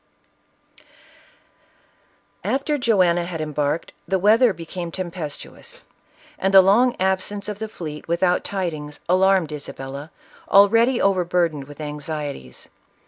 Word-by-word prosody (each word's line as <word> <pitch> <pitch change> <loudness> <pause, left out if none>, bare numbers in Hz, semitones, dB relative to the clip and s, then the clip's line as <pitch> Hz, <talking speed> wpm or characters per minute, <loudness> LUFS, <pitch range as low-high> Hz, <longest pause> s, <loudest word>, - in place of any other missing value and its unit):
After 285 +2 -1
Joanna 185 -8 +3
had 170 -2 -5
embarked, 150 0 -2
the 190 - +1
weather 220 +5 +5
became 170 0 -6
tempestuous, 185 - -7 0.6
and 195 - +1
the 190 -1 +8
long 235 +6 +4
absence 190 +2 -1
of 210 -1 -5
the 220 0 -4
fleet 155 -7 -8
without 175 +2 +1
tidings, 155 -7 -4
alarmed 185 -2 +3
Isabella, 140 0 -7 0.4
already 230 +5 +5
overburdened 175 -6 +1
with 145 +1 -13
anxieties. 150 - -6
180 Hz, 105 wpm, -22 LUFS, 150-200 Hz, 0.6 s, the